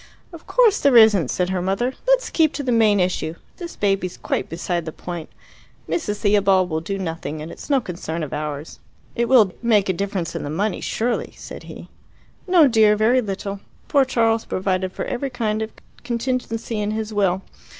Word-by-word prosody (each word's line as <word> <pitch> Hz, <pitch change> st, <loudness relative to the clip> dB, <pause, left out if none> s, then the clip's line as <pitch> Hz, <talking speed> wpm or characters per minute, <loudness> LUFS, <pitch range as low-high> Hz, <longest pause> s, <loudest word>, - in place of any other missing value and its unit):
"Of 335 Hz, -, -12 dB
course 465 Hz, -5 st, +4 dB
there 275 Hz, -4 st, +5 dB
isn't," 210 Hz, -, +6 dB
said 180 Hz, 0 st, -1 dB
her 185 Hz, -1 st, -1 dB
mother. 195 Hz, +8 st, 0 dB
"Let's -, -, +3 dB
keep 320 Hz, -2 st, +3 dB
to 285 Hz, -, -4 dB
the 255 Hz, -, 0 dB
main 220 Hz, -3 st, +4 dB
issue. 180 Hz, -3 st, -1 dB, 0.2 s
This 345 Hz, -2 st, -7 dB
baby's 195 Hz, -3 st, 0 dB
quite -, -, -2 dB
beside 170 Hz, 0 st, -3 dB
the 160 Hz, -, -4 dB
point. 175 Hz, 0 st, -7 dB, 0.6 s
Mrs. 210 Hz, -11 st, -2 dB
Theobald 195 Hz, -3 st, +3 dB
will 160 Hz, 0 st, -1 dB
do 195 Hz, +4 st, -3 dB
nothing, 165 Hz, -4 st, -4 dB
and 155 Hz, +2 st, -7 dB
it's -, -, -11 dB
no 280 Hz, -2 st, +4 dB
concern 170 Hz, -6 st, -5 dB
of 150 Hz, -, -6 dB
ours." 150 Hz, 0 st, -5 dB, 0.4 s
"It 235 Hz, 0 st, 0 dB
will 220 Hz, -8 st, +5 dB
make 215 Hz, -5 st, +3 dB
a -, -, +3 dB
difference 190 Hz, -3 st, -3 dB
in -, -, -3 dB
the 145 Hz, -, -5 dB
money, 200 Hz, +8 st, -1 dB
surely," 235 Hz, +2 st, -2 dB
said -, -, -9 dB
he. -, -, -10 dB, 0.6 s
"No, 350 Hz, -5 st, +6 dB
dear; 220 Hz, -3 st, +5 dB
very 230 Hz, +4 st, +3 dB
little. 200 Hz, -1 st, -4 dB, 0.3 s
Poor 280 Hz, -2 st, +4 dB
Charles 230 Hz, -3 st, +1 dB
provided 185 Hz, 0 st, -1 dB
for -, -, -5 dB
every 265 Hz, +2 st, -3 dB
kind 220 Hz, -3 st, -2 dB
of 220 Hz, 0 st, -4 dB, 0.3 s
contingency 235 Hz, -2 st, -2 dB
in 205 Hz, -, -1 dB
his 215 Hz, 0 st, -3 dB
will. 190 Hz, -2 st, +1 dB
205 Hz, 190 wpm, -22 LUFS, 180-240 Hz, 0.6 s, isn't